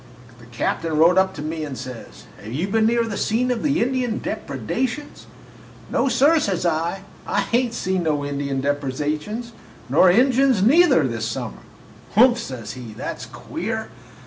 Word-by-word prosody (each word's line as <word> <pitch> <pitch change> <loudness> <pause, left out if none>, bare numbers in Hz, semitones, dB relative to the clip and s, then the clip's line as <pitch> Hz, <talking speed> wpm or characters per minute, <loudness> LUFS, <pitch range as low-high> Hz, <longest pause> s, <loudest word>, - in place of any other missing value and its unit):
The - - -15
captain 165 -2 -2
rode 170 +4 +6
up 190 0 +1
to 150 - -6
me 155 +1 -3
and 140 -4 -5
says, 130 -3 -9 0.2
'Have 105 - -8
you 155 +10 -1
been 220 +1 +3
near 235 +1 +2
the 215 -3 -4
scene 250 +3 +1
of 240 - -1
the 285 -4 +2
Indian 250 -2 -1
depredations?' 220 - -4 0.6
"'No, - - +1
sir,' 285 +6 +4
says 190 - -1
I, 170 +3 -1 0.2
'I 205 - +1
hain't 235 +3 0
seen 190 0 -1
no 150 -3 0
Injun 140 -1 -2
depredations, 150 - -2 0.4
nor 165 +7 +6
Injuns 255 +1 +4
neither, 280 - +5
this 115 -2 -3
summer.' 115 - -5 0.5
"'Humph!' 240 +2 +6
says 125 - -6
he, 120 -4 -9
'that's - - -5
queer!' - - -5
185 Hz, 160 wpm, -22 LUFS, 145-235 Hz, 0.6 s, rode